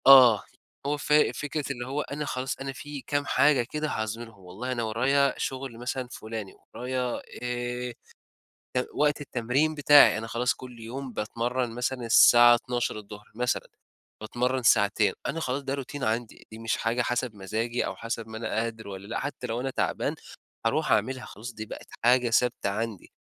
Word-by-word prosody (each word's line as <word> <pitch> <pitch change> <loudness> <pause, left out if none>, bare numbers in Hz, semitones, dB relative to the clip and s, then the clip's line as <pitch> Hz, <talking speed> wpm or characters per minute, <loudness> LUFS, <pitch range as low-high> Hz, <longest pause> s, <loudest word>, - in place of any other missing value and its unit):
آه، 125 -6 +9 0.4
هو 145 +1 0
ف 150 - -1
فكرة 150 0 +2
اللي 120 -2 -4
هو 140 +3 -1
أنا 150 +1 -4
خلاص 130 -1 -3
أنا 135 0 -4
في 145 +1 -7
كام 145 +1 -1
حاجة 140 -3 +4
كده 155 0 -1
هاظهرهم 115 -3 -4
والله 105 +9 -5
أنا 120 -2 -1
ورايا 135 +5 +2
شغل 130 -3 -4
مثلًا 125 +1 -3
فلاني، 110 -3 -6 0.2
ورايا 125 0 -2 0.2
آآ، 125 0 -3 1.0
وقت 150 0 +2
التمرين 135 +4 0
بتاعي، 145 -5 +7
أنا 115 +1 -5
خلاص 120 +2 +1
كل 125 -2 -11
يوم 125 +3 -6
باتمرّن 120 +3 -2
مثلًا 125 +1 -2
الساعة 120 +1 +8
12:00 105 -4 -4
مثلًا، 125 +1 -1 0.5
باتمرن 125 +4 -1
ساعتين، 105 -1 +4
أنا 165 - -2
خلاص 135 -2 -2
ده 135 0 -2
روتين 140 0 -5
عندي، 115 +1 -2
دي 110 - -9
مش 115 0 -1
حاجة 115 +2 0
حسب 120 -1 -1
مزاجي 110 +5 -2
أو - - -4
حسب 115 -1 -4
ما 110 0 -7
أنا 110 0 -4
قادر 110 -1 -2
والَّا 100 0 -8
لأ، 115 - -2
حتى 140 -3 -4
لو 115 +1 -2
أنا 135 - -2
تعبان - - -1 0.5
هاروح - - +1
أعملها 130 -1 +1
خلاص 115 +5 -8
دي 110 0 -6
بقِت - - -9 0.2
حاجة 125 0 +5
ثابتة 120 -3 +2
عندي، 110 -1 -4
125 Hz, 170 wpm, -27 LUFS, 115-135 Hz, 1.0 s, آه